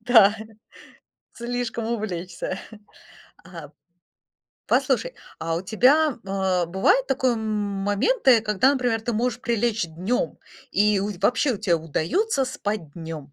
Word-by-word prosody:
Да, 220 Hz, -3 st, +6 dB, 1.0 s
слишком 235 Hz, -1 st, -3 dB
увлечься. 185 Hz, -5 st, -4 dB, 0.9 s
А, 165 Hz, -5 st, -10 dB, 1.0 s
послушай, -, -, +1 dB, 0.2 s
а 165 Hz, 0 st, -2 dB
у 175 Hz, -, -3 dB
тебя, 260 Hz, +9 st, +3 dB
а, 190 Hz, -3 st, 0 dB
бывают 190 Hz, +9 st, +2 dB
такое 260 Hz, -2 st, +1 dB
моменты, 215 Hz, -, +1 dB
когда, 215 Hz, +5 st, +2 dB
например, 245 Hz, -4 st, 0 dB
ты 235 Hz, +2 st, -3 dB
можешь 240 Hz, +2 st, -1 dB
прилечь 230 Hz, -4 st, 0 dB
днём, 185 Hz, -, -2 dB, 0.3 s
и 210 Hz, -1 st, +3 dB
у 205 Hz, +2 st, -2 dB
вообще 250 Hz, +6 st, +2 dB
у 205 Hz, -, -6 dB
тебе 180 Hz, -5 st, +2 dB
удаётся 225 Hz, -, 0 dB
спать 210 Hz, -, -4 dB
днём? 160 Hz, -4 st, -8 dB
215 Hz, 115 wpm, -24 LUFS, 185-245 Hz, 1.0 s, Да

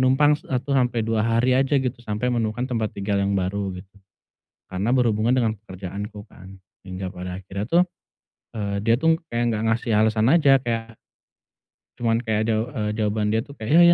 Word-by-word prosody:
numpang 135 Hz, +3 st, +4 dB
1 135 Hz, -1 st, -3 dB
sampe 125 Hz, -4 st, +1 dB
2 115 Hz, -1 st, 0 dB
hari 115 Hz, +3 st, +2 dB
aja 135 Hz, +2 st, +3 dB
gitu, 130 Hz, -2 st, -1 dB
sampai 120 Hz, +2 st, -2 dB
menemukan 115 Hz, +1 st, -1 dB
tempat 115 Hz, -4 st, -2 dB
tinggal 100 Hz, 0 st, 0 dB
yang 100 Hz, 0 st, +1 dB
baru, 95 Hz, 0 st, -2 dB
gitu. 95 Hz, +2 st, -12 dB, 0.8 s
Karena 100 Hz, +6 st, -1 dB
berhubungan 120 Hz, -2 st, +2 dB
dengan 115 Hz, -4 st, +1 dB
pekerjaanku, 100 Hz, +2 st, -7 dB
kan. 95 Hz, +1 st, -14 dB, 0.2 s
Hingga 95 Hz, 0 st, -5 dB
pada 90 Hz, +1 st, -6 dB
akhirnya, 100 Hz, +1 st, -5 dB
tuh, 170 Hz, +8 st, +4 dB, 0.7 s
eee, 100 Hz, -2 st, -2 dB
dia, 115 Hz, -, +4 dB
tuh, 160 Hz, +2 st, +4 dB, 0.2 s
kayak 120 Hz, +1 st, +1 dB
enggak 105 Hz, -, -2 dB
ngasih 115 Hz, +1 st, -1 dB
alasan 110 Hz, +1 st, +3 dB
aja 140 Hz, -4 st, +5 dB
kayak 115 Hz, -2 st, -3 dB, 1.0 s
cuman 115 Hz, 0 st, +1 dB
kayak 110 Hz, -2 st, 0 dB
daw 110 Hz, -1 st, +2 dB
eee, 105 Hz, -6 st, -2 dB
jawaban 105 Hz, -1 st, 0 dB
dia, 110 Hz, -, +2 dB
tuh, 140 Hz, -, -13 dB
kayak, 110 Hz, +3 st, -5 dB
"Iya, 175 Hz, +1 st, +8 dB
110 Hz, 175 wpm, -23 LUFS, 105-125 Hz, 1.0 s, Iya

